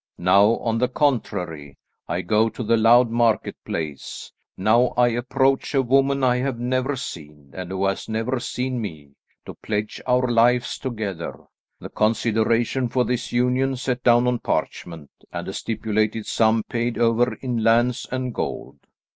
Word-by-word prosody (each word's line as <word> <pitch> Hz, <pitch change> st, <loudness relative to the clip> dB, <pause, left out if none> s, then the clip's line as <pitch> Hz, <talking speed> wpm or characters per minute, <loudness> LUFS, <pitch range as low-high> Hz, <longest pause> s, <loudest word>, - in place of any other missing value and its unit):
Now, 100 Hz, +5 st, +4 dB
on 115 Hz, -1 st, -1 dB
the 125 Hz, -, +2 dB
contrary, 90 Hz, -, -2 dB, 0.3 s
I 90 Hz, -, -2 dB
go 110 Hz, +5 st, +2 dB
to 115 Hz, +3 st, -6 dB
the 115 Hz, -, +2 dB
loud 115 Hz, +1 st, +5 dB
marketplace; 105 Hz, -, -2 dB, 0.3 s
now 115 Hz, +6 st, +3 dB
I 120 Hz, 0 st, +5 dB
approach 130 Hz, +4 st, 0 dB
a 135 Hz, -, +3 dB
woman 135 Hz, +2 st, +2 dB
I 125 Hz, -1 st, +3 dB
have 130 Hz, -1 st, -2 dB
never 130 Hz, +3 st, -1 dB
seen, 75 Hz, -, -9 dB
and 95 Hz, -1 st, -6 dB
who 95 Hz, +1 st, -1 dB
has 100 Hz, +2 st, -2 dB
never 115 Hz, +4 st, -1 dB
seen 125 Hz, 0 st, -3 dB
me, 80 Hz, -9 st, -7 dB, 0.3 s
to -, -, -8 dB
pledge 105 Hz, 0 st, -4 dB
our 125 Hz, 0 st, +2 dB
lives 120 Hz, +1 st, +2 dB
together, 105 Hz, -9 st, -5 dB, 0.4 s
the -, -, -8 dB
consideration 115 Hz, +3 st, +1 dB
for 125 Hz, +1 st, +1 dB
this 125 Hz, -1 st, -2 dB
union 125 Hz, +2 st, +1 dB
set 125 Hz, -1 st, -3 dB
down 120 Hz, 0 st, +5 dB
on 125 Hz, -1 st, +1 dB
parchment, 80 Hz, -9 st, -4 dB, 0.2 s
and -, -, -5 dB
a -, -, -5 dB
stipulated 110 Hz, 0 st, -1 dB
sum 110 Hz, -1 st, +2 dB
paid 120 Hz, 0 st, -2 dB
over 120 Hz, +1 st, +2 dB
in 120 Hz, -4 st, -3 dB
lands 120 Hz, +2 st, +2 dB
and 130 Hz, -1 st, -3 dB
gold." -, -, -5 dB
115 Hz, 155 wpm, -23 LUFS, 105-125 Hz, 0.4 s, loud